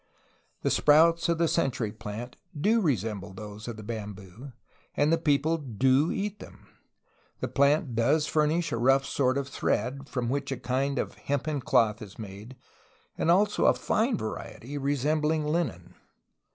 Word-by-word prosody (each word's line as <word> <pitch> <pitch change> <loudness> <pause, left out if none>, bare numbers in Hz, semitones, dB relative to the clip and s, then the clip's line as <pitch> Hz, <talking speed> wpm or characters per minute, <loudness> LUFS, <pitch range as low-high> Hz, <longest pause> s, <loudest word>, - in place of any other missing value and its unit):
The - - +1
sprouts 165 +3 +4
of 170 - +2
the 170 0 +2
century 130 -9 0
plant 110 +3 -7 0.2
do 220 +8 +3
re 150 - +2
semble 105 -1 -6
those 105 +2 -9
of 120 -2 -5
the 110 - -9
bamboo, 105 +2 -7 0.5
and 150 +3 +3
the - - +4
people 160 +1 +1
do 130 +3 +2
eat 205 +1 -3
them. - - -13 0.7
The - - -2
plant 140 -1 +2
does 120 +7 +2
furnish 155 +2 +1
a - - -1
rough 135 +3 +3
sort 130 -1 +1
of 140 -1 -2
thread, 135 +1 -2
from 125 -2 -2
which 140 +2 -2
a 135 - -2
kind 135 +3 -1
of - - -2 0.2
hempen 145 +1 -1
cloth 110 -2 +2
is 105 -2 -10
made 105 +4 -9 0.6
and - - -1
also 205 +4 +3
a - - +5
fine 230 +1 0
variety 120 +4 -6
resem 145 +2 0
bling 155 0 +1
linen. 155 -3 -2
140 Hz, 165 wpm, -28 LUFS, 115-155 Hz, 0.7 s, a